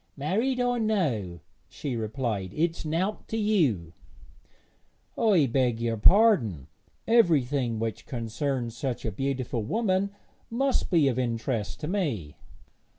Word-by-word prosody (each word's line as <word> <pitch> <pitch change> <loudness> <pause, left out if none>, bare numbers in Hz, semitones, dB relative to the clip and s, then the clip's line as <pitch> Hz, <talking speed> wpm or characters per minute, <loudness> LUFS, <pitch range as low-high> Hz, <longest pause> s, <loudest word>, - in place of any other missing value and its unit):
'Married 220 - 0
or 245 -1 +1
no,' 130 - -1 0.3
she 140 -5 -4
replied, 110 -4 -3
'it's 165 +1 0
nowt 170 +7 -2
to 225 - -3
you.' 150 - +1 1.2
'I 200 -10 +4
beg 125 -4 +2
your 115 -1 0
pardon; 120 - +4 0.4
everything 145 - +3
which 110 0 -4
concerns 120 0 -3
such 125 0 -3
a 110 - -1
beautiful 130 0 -2
woman 195 - 0 0.4
must 265 +3 0
be 165 -6 +4
of 130 -2 0
interest 115 -2 -2
to 150 - -3
me.' 140 - -2
135 Hz, 120 wpm, -27 LUFS, -, 1.2 s, I